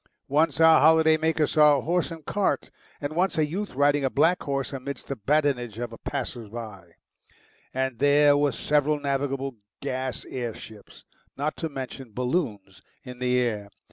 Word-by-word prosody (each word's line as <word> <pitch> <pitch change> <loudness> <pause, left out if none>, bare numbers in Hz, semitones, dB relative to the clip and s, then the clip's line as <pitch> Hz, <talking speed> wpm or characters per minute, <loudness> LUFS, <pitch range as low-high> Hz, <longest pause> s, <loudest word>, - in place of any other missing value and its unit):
Once 155 +5 +2
our 160 -3 +7
holiday 160 +1 +6
makers 160 -1 +1
saw 150 -2 +6
a - - -2
horse 175 +4 0
and 165 -3 -9
cart, 205 +3 -1 0.3
and 145 +2 -4
once 185 +1 +1
a 155 - +3
youth 190 +3 -5
riding 145 +1 +3
a 135 - +2
black 165 +7 +2
horse 140 -2 -3
amidst 140 +1 -6
the 140 - -2
badinage 125 -2 0
of 120 -1 -4
the 115 - -9
passersby. 110 -9 -6 0.8
And 130 -2 -2
there 145 +1 +5
were 145 0 +2
several 150 +4 +1
navigable 135 -2 -2 0.2
gas 130 0 -4
air 120 -3 -4
ships, 110 -2 -13 0.3
not 145 +3 -2
to 160 - -3
mention 130 -4 -7
balloons, 125 - -2 0.2
in 125 -2 -10
the 125 0 +1
air. 105 -5 -2
140 Hz, 165 wpm, -26 LUFS, 125-150 Hz, 0.8 s, our